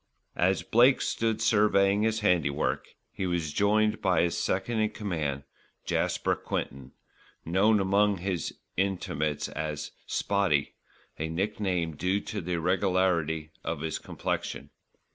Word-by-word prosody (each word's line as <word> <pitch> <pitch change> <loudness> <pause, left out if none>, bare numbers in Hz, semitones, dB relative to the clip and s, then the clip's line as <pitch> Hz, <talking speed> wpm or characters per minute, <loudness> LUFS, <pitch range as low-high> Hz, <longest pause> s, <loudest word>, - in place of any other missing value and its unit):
As 95 +2 +2
Blake 125 +4 +5
stood 110 -1 -1
surveying 105 -2 +4
his 110 0 +1
handiwork, 85 -8 +1 0.2
he 95 - -3
was 85 -4 -1
joined 105 +1 +2
by 90 -4 +3
his 85 - 0
second 110 +5 -1
in 110 0 +2
command, 80 -11 -3 0.4
Jasper - - 0
Quinton, 70 -1 -5 0.5
known 100 +6 +3
among 100 +1 +3
his 90 -1 -2 0.2
intimates 75 -6 -1
as 75 -1 -4 0.2
"Spotty," 95 -8 +1 0.5
a 80 +1 -2
nickname 90 -2 -1
due 90 +6 0
to 105 - -5
the 90 +1 -3
irregularity 85 -3 +1
of 80 -2 -3
his 80 -1 -2
complexion. - - -4
95 Hz, 125 wpm, -28 LUFS, 80-105 Hz, 0.5 s, Blake